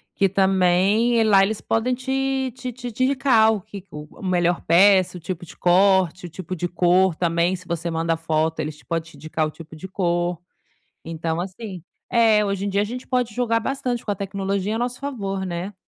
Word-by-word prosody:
que 195 -1 +2
também 195 +4 +3
e - - +4
lá 195 -3 +5
eles 210 +1 -1
podem 235 +3 0
te 265 0 -1
te 255 -1 -5
te 245 +1 -7
te 245 +4 -1
indicar 255 -5 +4
o 210 - -3
que 195 +1 -10
o 150 0 -10
melhor 175 -2 +1
peça, 185 +1 +4
o - - -9
tipo 175 +1 -6
de - - -14
corte, 185 0 +3
o - - -7
tipo 185 +2 -6
de 175 - -2
cor 180 0 +3
também 170 +2 +1
se 185 -1 -12
você 170 0 -3
manda 165 0 0
foto, 160 0 -1
eles 150 -1 -4
pod 165 -1 -3
te - - -16
indicar 155 0 -2
o - - -7
tipo 160 0 -12
de 175 +5 -8
cor, 175 -2 -1 0.7
então, 165 0 -3
assim 190 -1 -7 0.3
é, 225 -3 +4
hoje 200 0 -2
em - - -1
dia 200 +1 +1
a - - +2
gente 245 +4 -6
pode 250 -3 0
jogar 230 -1 +1
bastante 250 -1 -3
com 210 - -1
a - - -1
tecnologia 195 +1 -2
a - - -2
nosso 245 +1 -3
favor, 200 -9 -4
né. 180 +3 -4
190 Hz, 210 wpm, -22 LUFS, 175-225 Hz, 0.7 s, lá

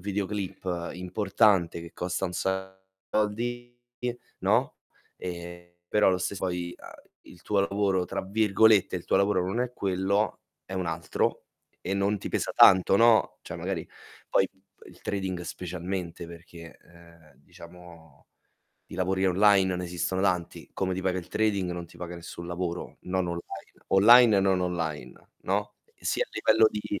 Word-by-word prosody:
videoclip 95 -3 -3
importante 95 -1 +1
che 85 - -11
costa 90 +2 -3
un 90 - -3
sacco 95 +1 -3 0.5
di 120 +3 -5 0.2
soldi 125 0 -2 0.2
no, - - +1 0.4
e, 85 0 -8
però 105 +3 +3
lo 95 -1 +2
stess 95 +2 -3
poi, 90 -1 -3
uhm, - - -14 0.2
"il 85 - -17
tuo 100 -2 +1
lavoro" 100 -2 +1
tra - - -3
virgolette, 105 0 +3
il 85 - -7
tuo - - +2
lavoro 100 -2 +2
non 110 +6 -1
è 125 -1 -1
quello, 100 +2 0 0.2
è - - -11
un 95 -2 -2
altro, 80 0 -1 0.4
e 95 - -3
non 100 +1 +1
ti - - -6
pesa - - -1
tanto, 95 +1 +7
no, 115 +1 +4
cioè - - -8
magari - - -4 0.4
poi, 95 - +3
mhmm, 95 -1 -34 0.3
il - - -17
trading 95 -3 -3
specialmente 90 0 -5
perché, 85 -1 -12
uhm, 85 -3 -19
diciamo 85 0 -15 0.6
di - - -8
lavori 95 +1 0
online 95 +1 +4
non 90 -1 -2
esistono 90 +1 -2
tanti, 90 -3 -1
come 95 -1 -1
ti 95 - -3
paga 95 -1 0
il - - -15
trading 100 -4 0
non 85 -1 -5
ti - - -17
paga 90 0 -7
nessun 85 0 -9
lavoro, 90 0 -4
non 90 -1 -1
online. 85 0 -4 0.4
Online 115 +3 +7
e - - +4
non 95 -1 +2
online, 85 -4 -4
no, 105 +2 -2 0.2
sia - - -1
a - - -28
livello 110 0 +4
di 105 -1 -4
95 Hz, 160 wpm, -27 LUFS, 85-100 Hz, 0.6 s, tanto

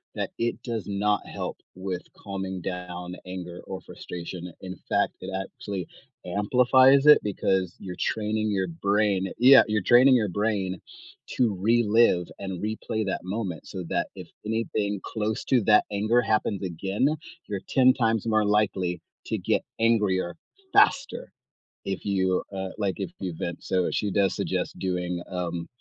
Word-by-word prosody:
that - - -3
it 120 0 -1
does 115 -5 -3
not 105 +1 0
help - - -5 0.2
with 95 -1 -4 0.2
calming 95 -2 -5
down 90 -1 -5
anger 90 -1 -7
or 95 -1 -5
frustration. 90 0 -7
In 95 0 -6
fact, - - +2
it 95 - -6
actually 95 -1 -6 0.4
amplifies 125 +8 +4
it 150 0 +9
because 95 -3 0
you're 90 -2 -7
training 110 0 -1
your 95 -2 0
brain 100 +2 0
Yeah, 130 +2 +8
you're 105 -1 +1
training 125 +5 +7
your 110 -4 +2
brain 100 -1 -1 0.6
to 115 -5 +2
relive 110 -4 +3
and 95 -3 -5
replay 110 0 -2
that 95 - -2
moment 95 -4 -4
so 95 -2 -6
that - - 0
if - - -9 0.2
anything 110 -2 -1
close 110 -1 -3
to 130 -2 +3
that 105 0 +5
anger 110 +4 +2
happens 110 -3 0
again, 95 - 0 0.4
you're 100 -2 -4
10 130 -1 +5
times 115 -3 0
more 110 -1 +3
likely 95 -4 +1 0.3
to - - -1
get - - 0 0.2
angrier 105 -6 +2 0.4
faster, 280 -9 +3 0.5
if 95 -1 -3
you, 95 -2 +1
uh, 95 0 -3
like, 100 -4 -1
if - - -3
you 90 -2 -3
vent, 85 0 -5
so 90 -1 +1
she 105 - -1
does 95 -1 +2
suggest - - -2
doing, 90 -1 -2
um, 85 -2 -3
100 Hz, 150 wpm, -26 LUFS, 90-110 Hz, 0.6 s, it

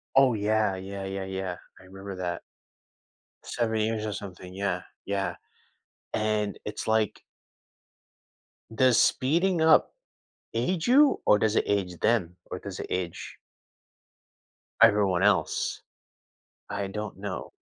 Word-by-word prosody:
Oh, 135 -2 +6
yeah, 105 -1 +1
yeah, 95 +1 -6
yeah, 95 0 -4
yeah, 95 -1 -4 0.2
I - - -16
remember 95 +1 -9
that. 90 -2 -3 1.0
7 115 -2 -1
years 110 0 -1
or 105 - -2
something, 90 -2 -8
yeah, 100 +1 -1 0.2
yeah. 95 -3 -1 0.8
And 105 -1 0
it's 105 0 -5
like 110 -1 +1 1.5
does 125 -1 +5
speeding 170 +6 +2
up 160 0 +5 0.6
age 160 +9 -1
you? 280 +4 +5
Or, 105 - +5
does 110 +1 +1
it - - +3
age 95 -4 -1
them? 100 -7 +1
Or - - -4
does - - -7
it - - -4
age 90 -2 -4 1.4
everyone 100 -5 +5
else? 95 -7 +1 0.9
I 100 -1 -3
don't 105 +2 -5
know. 100 -2 -5
105 Hz, 120 wpm, -27 LUFS, 95-110 Hz, 1.5 s, Oh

